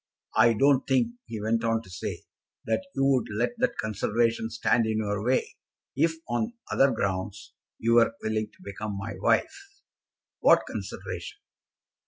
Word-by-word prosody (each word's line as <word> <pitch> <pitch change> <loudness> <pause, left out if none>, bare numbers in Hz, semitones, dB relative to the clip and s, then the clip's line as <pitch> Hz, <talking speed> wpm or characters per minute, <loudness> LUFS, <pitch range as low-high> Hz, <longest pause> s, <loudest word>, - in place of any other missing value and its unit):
"I 115 - +6
don't 135 +4 +3
think," 135 - +2 0.2
he 110 - -5
went 115 +2 0
on 115 0 +1
to 95 - -15
say, 90 - -5 0.4
"that 150 +12 -1
you 135 0 +2
would 135 -3 +3
let 120 +4 0
that - - +1
consideration 110 +2 0
stand 115 0 +2
in 110 0 0
your 105 -1 -1
way, 125 +3 0 0.4
if 160 +4 +3
on 125 - -1 0.2
other 135 - +5
grounds 95 -3 -3 0.2
you 115 +1 +1
were 115 -1 +5
willing 110 0 -1
to - - -21
become 100 +1 -5
my 100 +3 -5
wife." - - +2 0.8
"What - - +5
consideration?" - - -6
115 Hz, 155 wpm, -27 LUFS, 105-125 Hz, 0.8 s, I